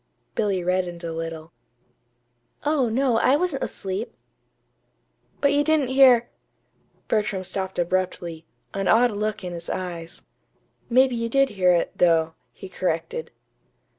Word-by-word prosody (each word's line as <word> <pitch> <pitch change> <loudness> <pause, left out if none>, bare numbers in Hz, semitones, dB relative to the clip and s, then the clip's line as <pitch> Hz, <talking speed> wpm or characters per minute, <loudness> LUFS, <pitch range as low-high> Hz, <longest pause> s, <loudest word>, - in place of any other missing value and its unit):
Billy 200 -4 0
reddened 180 -1 -1
a 165 -1 -4
little. 165 0 -6 1.1
"Oh, 290 -5 +2
no, 245 0 +2
I 265 - +4
wasn't 320 -3 -1
asleep." 195 +4 -5 1.3
"But 280 0 +3
you 290 0 +3
didn't 305 -4 +2
hear 260 -3 +6 0.4
" - - -41
Bertram 210 -3 0
stopped 190 0 -4
abruptly, 175 -2 -2 0.3
an 195 -1 -2
odd 240 +2 +5
look 210 0 -3
in 180 -1 -5
his 170 0 -7
eyes. 175 -3 -5 0.7
"Maybe 255 +1 +4
you 230 0 -2
did 275 +2 +3
hear 185 -4 +2
it, 170 - 0
though," 165 -2 +3 0.2
he 190 - -10
corrected. 185 - -3
195 Hz, 135 wpm, -24 LUFS, 175-255 Hz, 1.3 s, hear